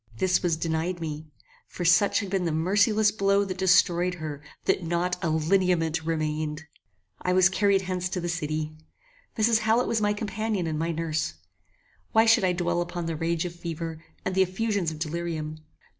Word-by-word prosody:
This 185 +9 +2
was 170 -3 +1
denied 165 +2 -2
me; 155 -1 -5 0.4
for 175 - -5
such 200 +6 +4
had 200 -3 -6
been 190 -2 0
the 165 - 0
merciless 205 +6 +3
blow 200 -1 +2
that 185 -1 -5
destroyed 180 -1 +3
her, 155 -4 -6 0.2
that - - +2
not 175 +2 0
a 170 - +1
LINEAMENT 165 0 +1
REMAINED! 155 -1 -2 0.6
I 180 - 0
was 185 0 +5
carried 195 0 +2
hence 180 -1 -2
to 185 - -2
the 175 - -3
city. 155 -2 -2 0.7
Mrs. 220 0 +3
Hallet 225 +2 +2
was 225 -2 0
my 205 0 +2
companion 210 -2 -2
and 155 -2 -2
my 165 +1 0
nurse. 160 -1 -2 0.8
Why 225 0 +5
should 225 -3 +5
I 185 - +3
dwell 175 -1 0
upon 175 0 -4
the 165 -1 -2
rage 165 +2 -1
of 175 - -5
fever, 165 -1 -6 0.2
and - - -1
the 190 - +3
effusions 195 -1 0
of 160 - -7
delirium? 155 -1 -4
175 Hz, 180 wpm, -26 LUFS, 160-195 Hz, 0.8 s, was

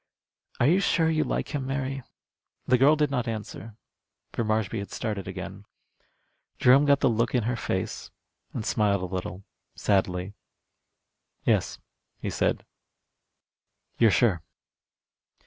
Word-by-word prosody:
Are - - +4
you 170 +7 +5
sure 165 -4 +2
you 155 -1 +2
like - - -2
him, 135 -3 -2
Mary?" 135 0 -2 0.6
The 125 -1 +3
girl 145 +4 +6
did 150 -2 +1
not 125 -4 -1
answer, 110 -1 -6 0.6
for 115 - -1
Marshby 110 0 0
had 100 - -6
started 105 -4 -4
again. 95 +1 -7 0.9
Jerome 135 +3 +6
got 140 -1 +4
the - - +4
look 115 +1 +1
in 120 - +2
her 120 +2 0
face, 95 -5 -3 0.4
and 110 - -4
smiled 100 -4 +1
a 90 +1 -5
little, 95 +1 -4 0.3
sadly. 95 -1 0 1.1
"Yes," - - +1 0.4
he - - -4
said, - - 0 1.3
"you're 115 - +6
sure." 105 -6 +3
115 Hz, 130 wpm, -27 LUFS, 100-135 Hz, 1.3 s, girl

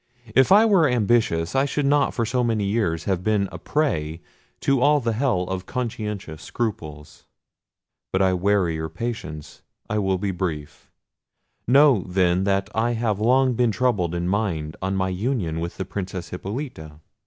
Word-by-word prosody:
If 130 +8 +4
I 210 +3 +7
were 190 -9 +4
ambitious, 110 -7 +1
I 135 +1 +3
should 145 0 -1
not 145 0 +3
for 115 - 0
so 125 +2 0
many 115 -3 0
years 100 -6 0
have 95 -2 -1
been 105 -2 +1
a - - -8
prey 80 - -1 0.4
to 135 -2 +2
all 145 +2 +4
the 115 -3 -1
hell 115 -6 +1
of 95 0 -5
conscientious 105 -9 -4
scruples. 75 -10 -5 0.9
But 95 - +1
I 95 -1 +3
weary 95 -2 +1
your 80 0 -4
patience: 85 -5 -6 0.3
I 105 - -1
will 95 -2 +1
be 100 +1 -2
brief. 80 -6 -5 0.8
Know, 135 -5 +5
then, 90 0 +1
that 100 0 +1
I 115 +2 +1
have 110 -3 -1
long 130 +3 +3
been 120 0 +2
troubled 105 -7 0
in 85 0 -2
mind 90 -6 -1
on 95 +1 -1
my 95 0 0
union 95 -4 -2
with 85 +1 -5
the 95 - -3
Princess 95 -2 -5
Hippolita. 90 - -6
100 Hz, 165 wpm, -23 LUFS, 90-120 Hz, 0.9 s, I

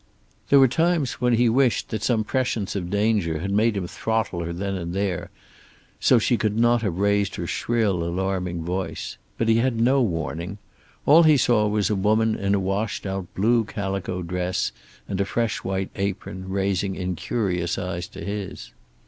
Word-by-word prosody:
There 140 - +7
were 135 - +7
times 160 -1 0
when 125 -1 +3
he 120 +1 +4
wished 125 +1 +2
that 110 - -3
some 115 -2 +1
prescience 115 -4 -1
of 90 -3 -3
danger 100 -5 +1
had 95 +5 -3
made 105 +1 +2
him 95 - -2
throttle 110 -2 -2
her 85 - -4
then 95 +3 -3
and 85 -2 -4
there, 90 -3 -2 0.7
so 125 - +5
she 120 +2 +2
could 110 -1 0
not 120 0 +4
have 95 -6 -2
raised 100 0 +1
her 85 - -4
shrill, 105 -3 0
alarming 90 -1 -2
voice! 90 -2 -4 0.2
But 115 - 0
he 115 0 +4
had 115 -1 +1
no 130 +4 +4
warning. 85 -1 -2 0.5
All 160 +4 +7
he 155 -3 +6
saw 115 -5 +3
was 105 -1 +1
a - - +2
woman 110 +3 +2
in 100 0 0
a - - +1
washed 100 +3 -2
out 95 -2 -4
blue 115 +4 +3
calico 95 -3 -3
dress 90 +1 -1 0.4
and 100 -1 -2
a - - +4
fresh 115 +2 -1
white 95 0 -2
apron, 95 -1 -4
raising 95 0 0
incurious 90 -1 -2
eyes 90 -2 -4
to 95 - -9
his. 100 -1 -5
100 Hz, 180 wpm, -24 LUFS, 90-115 Hz, 0.7 s, There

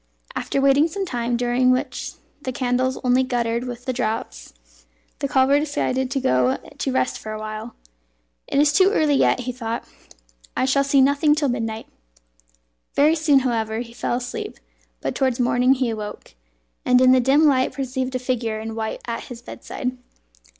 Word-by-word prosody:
After - - -1
waiting 275 +3 +4
some 390 +4 -3
time, 240 -6 -1
during 245 +1 +2
which 255 +1 -1 0.3
the 260 - -3
candles 255 +1 0
only 250 0 +3
guttered 240 -2 -1
with 245 0 -7
the 255 - -1
draughts, 220 - -3 0.7
the 280 - -1
cobbler 270 +1 +4
decided 265 -3 -1
to 270 +1 -1
go 130 - +2
to 270 - -5
rest 255 0 0
for 215 - -6
a - - -4
while. 215 +2 -6 0.7
"It - - -2
is 290 +1 +4
too 380 0 +5
early 305 -6 +3
yet," 270 - +3
he 250 +1 -3
thought; 235 -2 -4 0.7
"I - - +2
shall 275 +1 +3
see 275 0 +3
nothing 285 +2 +4
till 295 -3 0
midnight." 225 -2 -3 1.1
Very 300 +3 +5
soon, 300 -4 +3
however, 225 -3 -1
he 235 -1 -9
fell 240 - -2
asleep; 245 0 -5 0.4
but - - -2
towards 260 -2 0
morning 250 +2 +3
he 255 -3 0
awoke, 210 - -7 0.5
and 250 0 +4
in 255 0 +6
the 260 - +6
dim 275 +5 +4
light 260 -3 +3
perceived 260 -1 -3
a - - +3
figure 245 -3 -2
in 220 0 -5
white 220 0 -4
at 230 -1 -4
his 240 -1 -10
bedside. 250 0 -5
255 Hz, 175 wpm, -22 LUFS, 235-270 Hz, 1.1 s, in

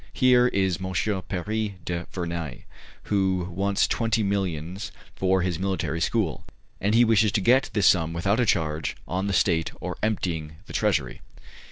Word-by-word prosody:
Here 125 -1 +5
is 95 -5 0
M. 95 0 -4 0.4
Paris 105 +3 -2
du 85 0 -3
Vernai, 85 -5 -4 0.4
who 95 -3 0
wants 100 +3 +1
twenty 115 -1 0
millions 95 -2 -2 0.2
for 95 -1 +2
his 90 -2 -1
military 95 -3 -2
school; 100 -2 0 0.4
and 105 +3 +1
he 120 +1 +6
wishes 110 -2 +4
to 110 - +3
get 125 +7 +3
this 105 -3 +2
sum 80 -3 +4
without 100 +7 0
a 125 - +3
charge 80 -4 0
on 95 +2 -2
the 100 - -1
state 85 -3 +2
or - - -5
emptying 85 -8 -2
the - - -11
treasury." 90 - 0
95 Hz, 160 wpm, -25 LUFS, 85-105 Hz, 0.4 s, he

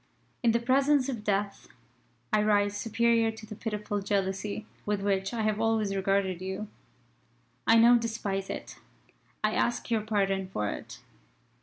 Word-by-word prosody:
"In 240 - +3
the 235 - +2
presence 270 +3 +3
of 235 -5 -4
Death, 200 -1 -1 0.7
I 215 - +4
rise 205 -1 +2
superior 230 +1 +2
to 220 0 -11
the 215 - -8
pitiful 210 -1 -3
jealousy 200 +1 -2 0.2
with 205 -1 -1
which 195 -1 0
I 230 -2 -2
have 215 0 0
always 220 -3 +1
regarded 195 -2 0
you. 190 +3 -4 1.0
I 225 - +7
now 235 +2 +7
despise 210 -4 -3
it. - - -6 0.7
I 215 0 +2
ask 240 0 0
your 225 -2 +2
pardon 195 -3 0
for 105 - -2
it. - - -8
210 Hz, 150 wpm, -29 LUFS, 195-225 Hz, 1.0 s, I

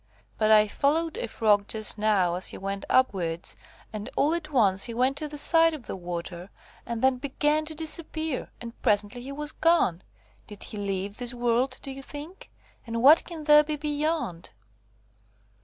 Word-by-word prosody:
But 215 - +2
I 215 -1 +6
followed 310 +8 0
a - - -3
Frog 210 -2 +1
just 215 -1 0
now 200 -5 +2
as 180 +1 -3
he - - -4
went 195 0 -5
upwards, 180 -10 0 0.4
and 215 +3 -6
all 300 +3 +2
at 335 -2 -4
once 195 -8 +3
he 235 - -6
went 255 +3 +1
to 305 - -3
the 295 0 -8
side 330 +2 +5
of 275 - -11
the - - -5
water, 175 0 -6 0.4
and 235 0 -4
then 260 -1 +3
began 295 +3 0
to 315 0 -5
disappear, 315 -2 +2
and 235 0 -10
presently 210 +1 0
he 265 +3 -8
was 295 +1 -4
gone. 320 - +2 0.5
Did 210 -2 -9
he 215 - -6
leave 200 0 -4
this 245 0 -5
world, 245 +2 0
do 275 - -6
you 270 +1 -8
think? 295 +7 -10 0.4
And 230 +1 -3
what 300 +4 +7
can 330 -3 -8
there 300 0 +6
be 300 0 -3
beyond?" 295 - -3
250 Hz, 180 wpm, -26 LUFS, 205-300 Hz, 0.5 s, what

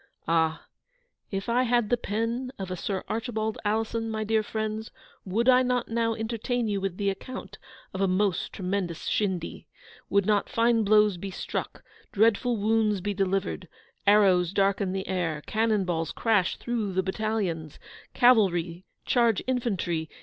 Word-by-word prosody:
Ah! 160 -1 +1 0.6
if 195 -1 -4
I 240 +2 +2
had 240 -3 +1
the - - +6
pen 235 +3 -2
of 190 -2 -5
a - - -1
Sir 190 +2 -3
Archibald 220 -1 -2
Alison, 225 +2 -1
my 220 0 -2
dear 220 +1 +2
friends, 220 0 -4 0.4
would 220 +6 0
I 255 0 +7
not 250 -1 0
now 230 0 0
entertain 230 +2 -2
you 200 -2 -1
with 190 -2 -3
the 200 -1 +1
account 195 -1 -8 0.3
of 190 - -3
a 195 - +3
most 185 -1 0
tremendous 185 -3 -3
shindy? 190 -5 -2 0.4
Should 200 -1 +3
not 210 -1 +1
fine 230 -3 +2
blows 210 -2 +4
be 195 +3 -5
struck? 185 - -5 0.3
dreadful 230 +3 +2
wounds 215 -1 +2
be 205 +3 -2
delivered? 195 -1 -1 0.4
arrows 190 -4 +5
darken 195 -1 +1
the 190 0 -3
air? 165 -5 -2
cannon 215 -3 +1
balls 165 -2 -1
crash 210 -6 +1
through 225 -5 -2
the 190 +1 +1
battalions? 190 -6 -2 0.4
cavalry 185 -8 +3 0.2
charge 235 -5 +2
infantry? 190 -11 -1
210 Hz, 150 wpm, -27 LUFS, 190-225 Hz, 0.6 s, I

